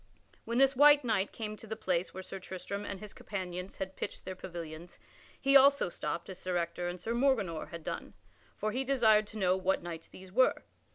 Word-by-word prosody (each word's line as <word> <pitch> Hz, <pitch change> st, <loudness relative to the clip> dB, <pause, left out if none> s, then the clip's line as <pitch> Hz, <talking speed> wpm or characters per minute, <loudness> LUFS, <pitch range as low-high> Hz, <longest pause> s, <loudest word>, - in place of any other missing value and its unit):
When 235 Hz, +1 st, -1 dB
this 270 Hz, +1 st, +5 dB
white 290 Hz, +1 st, +7 dB
knight 210 Hz, -4 st, +1 dB
came 215 Hz, -2 st, -5 dB
to 220 Hz, -, -12 dB
the 220 Hz, -, -3 dB
place 185 Hz, -4 st, -1 dB
where 190 Hz, -, -7 dB
Sir 195 Hz, -, -7 dB
Tristram 190 Hz, +2 st, -5 dB
and 195 Hz, -, -5 dB
his 210 Hz, 0 st, -8 dB
companions 180 Hz, -2 st, -5 dB
had 190 Hz, 0 st, -5 dB
pitched -, -, -5 dB
their 185 Hz, -, -5 dB
pavilions, 170 Hz, -2 st, -8 dB, 0.4 s
he 275 Hz, 0 st, +3 dB
also 275 Hz, -5 st, +7 dB
stopped 170 Hz, 0 st, -4 dB
as 185 Hz, -, -8 dB
Sir 185 Hz, -1 st, -1 dB
Ector 170 Hz, +1 st, -2 dB
and 175 Hz, +1 st, -4 dB
Sir 230 Hz, -, -3 dB
Morganor 235 Hz, -, +1 dB
had 170 Hz, -1 st, -8 dB
done, -, -, -5 dB, 0.4 s
for 215 Hz, -, -2 dB
he 255 Hz, +4 st, -1 dB
desired 220 Hz, -6 st, +4 dB
to 215 Hz, -, -9 dB
know 185 Hz, -2 st, +3 dB
what 190 Hz, -1 st, 0 dB
knights 165 Hz, -2 st, -6 dB
these 185 Hz, 0 st, -13 dB
were. 255 Hz, +6 st, +3 dB
190 Hz, 210 wpm, -32 LUFS, 180-230 Hz, 0.4 s, white